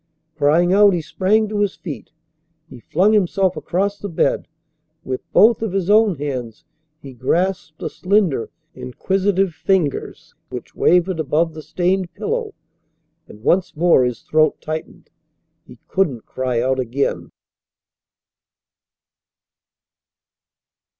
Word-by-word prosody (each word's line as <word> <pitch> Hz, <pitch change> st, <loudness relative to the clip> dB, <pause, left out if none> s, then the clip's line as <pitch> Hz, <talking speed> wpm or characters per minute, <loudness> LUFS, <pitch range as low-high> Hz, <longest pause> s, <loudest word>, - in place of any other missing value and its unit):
Crying 160 Hz, +4 st, +3 dB
out, 205 Hz, 0 st, +6 dB
he 170 Hz, -, -1 dB
sprang 210 Hz, +7 st, +1 dB
to 210 Hz, 0 st, -3 dB
his 205 Hz, -2 st, 0 dB
feet. 155 Hz, -6 st, -8 dB, 0.6 s
He 130 Hz, -5 st, -12 dB
flung 185 Hz, -, +2 dB
himself 190 Hz, -2 st, +2 dB
across 195 Hz, +6 st, -2 dB
the 205 Hz, -, -5 dB
bed. 165 Hz, -, 0 dB, 0.6 s
With 130 Hz, -1 st, -4 dB
both 225 Hz, +2 st, +5 dB
of 220 Hz, -5 st, -2 dB
his 195 Hz, 0 st, 0 dB
own 215 Hz, -3 st, +4 dB
hands 130 Hz, -6 st, -5 dB, 0.3 s
he 135 Hz, -3 st, -11 dB
grasped 160 Hz, +5 st, -1 dB
the -, -, -4 dB
slender, 185 Hz, -, 0 dB, 0.2 s
inquisitive 190 Hz, +9 st, -1 dB
fingers 175 Hz, -5 st, -2 dB, 0.2 s
which -, -, -8 dB
wavered 180 Hz, 0 st, +2 dB
above 160 Hz, +2 st, 0 dB
the 155 Hz, -, -8 dB
stained 180 Hz, +3 st, -1 dB
pillow, 450 Hz, -2 st, -3 dB, 0.7 s
and 105 Hz, -, -15 dB
once 180 Hz, +4 st, +1 dB
more 165 Hz, -4 st, +4 dB
his 125 Hz, -1 st, -3 dB
throat 155 Hz, 0 st, +2 dB
tightened. 155 Hz, 0 st, -7 dB, 0.6 s
He -, -, -14 dB
couldn't 145 Hz, -, -1 dB
cry 130 Hz, -2 st, -2 dB
out 130 Hz, +1 st, 0 dB
again. 130 Hz, +3 st, -2 dB
175 Hz, 120 wpm, -20 LUFS, 145-195 Hz, 0.7 s, out